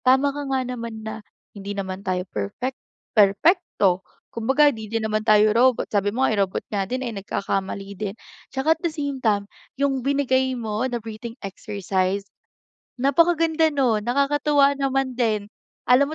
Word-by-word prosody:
Tama 280 +1 +1
ka 290 - -3
nga 265 - +2
naman, 235 -2 -5
na 220 0 -6 0.3
hindi 200 0 -6
naman 190 -1 -5
tayo 185 -1 -1
perfect, 175 - -3 0.4
perpekto. 205 - +3 0.3
Kumbaga 265 +6 +3
hindi 220 -4 -7
din 225 -1 -1
naman 215 0 -1
tayo 215 0 +6
robot, 250 +1 +3
sabi 205 -1 +1
mo 260 - +1
nga - - +1
eh, - - -1
robot 190 - -4
nga 200 -2 0
din 255 +1 -2
ay 225 -3 -5
nagkakamali 195 0 -3
din. 205 -1 -3 0.4
Tsaka 270 +4 +2
at - - -34
the 335 - +1
same 285 -4 -3
time 205 -3 +2 0.3
'yung 270 -2 +1
binigay 260 -2 +1
mo 215 -1 -2
na 240 - -1
breathing 225 +1 -7
exercise, 195 -1 -2 0.7
napakaganda 320 +3 +3
nun, 240 -7 +2
nakakatuwa 280 +2 +3
naman 270 -1 0
din. 215 -4 0 0.4
Alam 280 +5 +4
235 Hz, 160 wpm, -23 LUFS, 205-275 Hz, 0.7 s, tayo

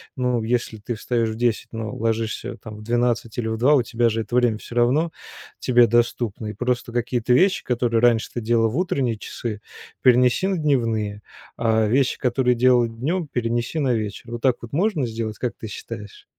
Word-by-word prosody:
ну, 125 -2 0
если 115 0 -1
ты 110 +3 -5
встаёшь 115 0 -1
в - - -5
10, 120 -1 0
но 110 -2 -4
ложишься, 115 0 -2
там, 110 -1 -8
в - - -11
12 120 0 0
или 110 -2 -1
в 110 - -2
2, 130 +6 +4
у 130 - +3
тебя 120 0 +1
же 115 0 0
это 110 +2 -5
время 120 -3 +3
всё 120 - -11
равно 135 +8 +2 0.5
тебе 120 -1 +5
доступно. 120 -2 0
И 105 - -4
просто 120 +1 -2
какие-то 120 0 0
вещи, 185 +9 +4
которые 120 -2 +1
раньше 115 -1 +3
ты - - -1
делала 115 0 +2
в 120 - -4
утренние 135 -10 0
часы, 110 0 -5 0.4
перенеси 125 +7 +4
на 195 -1 0
дневные. 115 -9 0 0.3
А 110 -1 +2
вещи, 130 +4 +2
которые 125 0 +1
делала 120 0 +4
днем, 150 +10 -2
перенеси 120 +3 -2
на 135 -4 +1
вечер. 110 +1 -4
Вот 120 0 -5
так 130 -1 +3
вот 115 - -9
можно 170 -2 +1
сделать, 110 -2 -4
как 125 - -3
ты 110 - -7
считаешь? 105 0 -9
120 Hz, 195 wpm, -23 LUFS, 110-125 Hz, 0.5 s, тебе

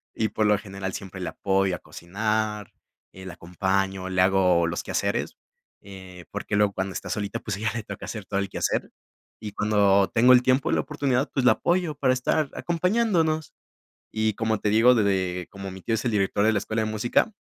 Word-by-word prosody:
y 110 -1 0
por 110 - 0
lo 105 -1 +4
general, 95 -2 -6
siempre 95 -1 -7
le 90 - -4
apoyo 95 -1 0
a - - -9
cocinar, 105 +3 -3 0.4
eh, 95 0 -12
la 90 - -7
acompaño, 95 +2 -2
le 95 -1 +1
hago 90 -3 +3
los 85 +1 -3
quehaceres, - - -2 0.5
eh, 95 -3 -12
porque 100 - -3
luego 105 -1 +2
cuando 95 +1 -3
está - - -6
solita, 105 +2 -3
pues 105 -3 -4
a - - -9
ella 110 -2 -1
le 115 -3 -4
toca - - -8
hacer 105 -3 -6
todo 100 0 -2
el 100 -1 -2
quehacer, - - -1 0.5
y 105 -2 -7
cuando 100 -2 +3
tengo 125 +3 +6
el 125 - +6
tiempo, 130 +1 +2
la - - +2
oportunidad, 140 -2 -1
pues 130 -2 0
la - - +7
apoyo 175 -4 0
para 135 -2 +2
estar 135 +3 0
acompañándonos, 170 -3 0 0.6
y, 110 -1 0
como 110 0 -1
te 105 - 0
digo, 115 +4 +5
de 110 - +3
de 95 -3 -1
como 95 -1 -8
mi 95 0 -10
tío 115 - -1
es 110 - -4
el 120 - +1
director 100 0 +1
de 110 - +4
la 100 - +1
escuela 110 +2 -2
de 110 - -2
música 120 - +1
105 Hz, 210 wpm, -25 LUFS, 95-120 Hz, 0.6 s, la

